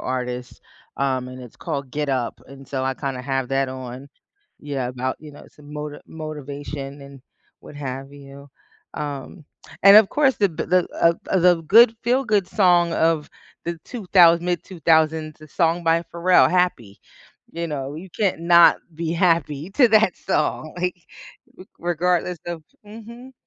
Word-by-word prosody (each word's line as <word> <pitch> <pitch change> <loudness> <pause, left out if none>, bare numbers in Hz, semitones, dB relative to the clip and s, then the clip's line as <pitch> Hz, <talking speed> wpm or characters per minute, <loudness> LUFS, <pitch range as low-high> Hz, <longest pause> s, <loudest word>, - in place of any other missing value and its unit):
artist, 125 -1 -5 0.4
um, 130 -2 -1
and 130 0 -10
it's 125 - -13
called 140 -5 -5
“Get 145 +1 -2
Up,” 130 -3 -2
and 135 0 -14
so 130 -2 -3
I, 135 - 0
kinda, 130 -1 -5
have 135 -1 -2
that 135 0 0
on 130 +1 -8 0.5
Yeah, 140 -4 -3
about, 130 +1 -3
you 150 -1 -12
know, 145 - -14
some 150 0 -16
moti 150 0 -6
motivation 145 -2 -7
and 140 -1 -13 0.4
what 150 - -13
have 135 -1 -6
you, 140 0 -13 0.5
um, 145 +3 -6 0.4
and 200 +1 +9
of 215 -2 +7
course 275 -3 +2
the 200 - +2
b 160 - -5
the, 180 0 +2
uh, 170 0 +5 0.2
uh, 190 - +3
the 175 -1 +4
good 225 +7 +6
feel-good 235 -5 +1
song 175 -4 +3
of 160 -2 +1 0.4
the 170 0 -4
two-thous 180 -7 +4
mid 175 0 -2
2000s, 160 -3 0
a - - -11
song 170 +2 0
by 165 0 +2
Pharrell, 175 +2 +4
Happy, 180 - 0 0.5
you 170 +1 -4
know, 140 -3 -5
you 170 +5 -9
can't 190 -2 -1
not 170 0 +6 0.2
be 165 0 -3
happy 165 -3 0
to 245 +4 +4
that 215 -4 +3
song, 155 0 -2
like, 180 0 -2 0.6
r 185 - -11
regardless 175 0 -1
of 170 -2 -5 0.2
mhm. 235 +4 -12
160 Hz, 160 wpm, -22 LUFS, 140-180 Hz, 0.6 s, and